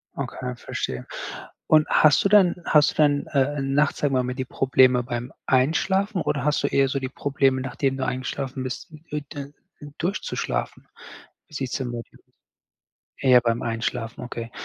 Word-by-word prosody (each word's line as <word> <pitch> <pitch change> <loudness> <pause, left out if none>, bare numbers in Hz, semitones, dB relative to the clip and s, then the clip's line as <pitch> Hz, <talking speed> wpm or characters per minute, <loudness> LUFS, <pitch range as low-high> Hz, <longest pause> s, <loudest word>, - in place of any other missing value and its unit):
Okay, 125 -1 -5
verstehe. 65 - -5 0.6
Und 155 -1 +5
hast 155 -2 +5
du 195 - +4
dann 195 -4 +5
hast 150 -1 +4
du - - -15
dann, 145 -2 +2
äh, 140 +1 0
nachts 140 +2 +1
sagen 140 -2 +1
wir 130 - +2
mal 125 - -3
die 130 -1 -3
Probleme 130 -1 +3
beim 120 +1 -5
Einschlafen 185 +9 +1
oder 140 -2 -1
hast 150 -1 +1
du - - +3
eher 135 -1 +2
so 140 +1 -1
die 130 -1 -4
Probleme, 135 -1 +1
nachdem 135 +1 -1
du 130 - -2
eingeschlafen 130 +1 -3
bist, 130 +5 -6 0.2
u 150 - -1
d 145 -2 -5 0.4
u 145 -1 -9
durchzuschlafen, 185 +5 -3 0.6
wie 155 - -22
sieht 135 -3 -3
es - - -1
denn 125 -3 -4
bei 120 -1 -4
dir - - -20 1.0
eher 125 -2 +6
beim 115 -1 0
Einschlafen, 115 0 -3
okay. 120 -1 -6
135 Hz, 175 wpm, -24 LUFS, 125-145 Hz, 1.0 s, eher